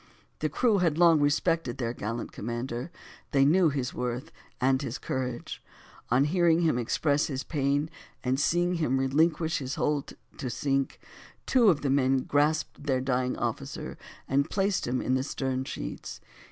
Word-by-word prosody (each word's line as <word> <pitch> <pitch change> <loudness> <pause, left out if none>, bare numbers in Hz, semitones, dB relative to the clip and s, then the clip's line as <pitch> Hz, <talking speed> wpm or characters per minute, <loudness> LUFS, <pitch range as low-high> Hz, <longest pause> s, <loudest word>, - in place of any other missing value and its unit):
The 155 - 0
crew 215 - +2
had 165 -4 +1
long 170 -2 +6
respected 145 -2 +1
their 120 -2 -2
gallant 115 +1 -4
commander; 120 - -4 0.4
they 135 -1 +5
knew 170 +3 +5
his 135 -3 -2
worth 125 +1 -3 0.3
and 130 +1 +2
his 130 -4 -4
courage: 125 -2 -4 0.5
on 125 +3 +4
hearing 170 +1 +3
him 155 -7 +2
express 140 +5 +1
his 135 -2 -3
pain, 145 0 0 0.4
and 130 +1 +1
seeing 175 +4 +2
him 135 -5 +1
relinquish 160 +4 +2
his 130 -1 -4
hold 150 -2 -1 0.3
to 130 - -3
sink, 135 +1 -1 0.5
two 240 -5 +5
of 160 -6 +2
the 140 - 0
men 135 -1 +2
grasped 145 +1 0
their 135 -3 +1
dying 130 -1 0
officer, - - -4 0.3
and 140 +3 +1
placed 195 -1 0
him 125 +1 -1
in 130 - 0
the 130 - +2
stern 130 -1 -2
sheets. - - -6
140 Hz, 160 wpm, -28 LUFS, 130-160 Hz, 0.5 s, long